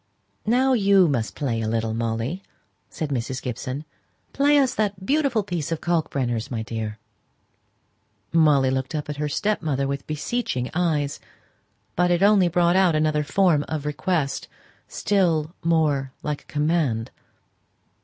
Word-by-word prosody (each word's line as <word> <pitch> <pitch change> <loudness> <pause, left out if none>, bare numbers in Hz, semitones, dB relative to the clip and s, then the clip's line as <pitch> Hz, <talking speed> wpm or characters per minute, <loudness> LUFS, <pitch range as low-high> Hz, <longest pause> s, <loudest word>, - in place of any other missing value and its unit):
"Now, 260 +4 +3
you 200 -5 +5
must 120 -7 -1
play 120 -6 -1
a 110 - -2
little, 110 0 -1
Molly," 115 +9 -2 0.5
said 155 - -4
Mrs. 130 0 -2
Gibson; 130 +3 -5 0.5
"play 290 +1 +4
us 270 -3 +3
that 200 -3 -2
beautiful 275 -5 +1
piece 175 -6 -3
of 165 - -1
Kalkbrenner's, 135 -9 -1
my 115 -3 -3
dear." 110 -1 -4 1.4
Molly 150 -5 +4
looked 130 +4 -2
up 150 -1 -4
at 145 - -4
her 150 0 -2
stepmother 150 -7 0
with 140 0 -4
beseeching 150 - -2
eyes; 155 -5 0 0.8
but 180 +1 +2
it 175 +1 +2
only 200 -3 +5
brought 175 +1 +2
out 185 -4 +4
another 155 -1 +1
form 155 0 +2
of 155 -2 -4
request, 150 -1 -1 0.4
still 170 -6 +1
more 150 -5 +1
like 150 -1 -3
a - - -27
command. 150 -7 0
155 Hz, 140 wpm, -24 LUFS, 135-180 Hz, 1.4 s, you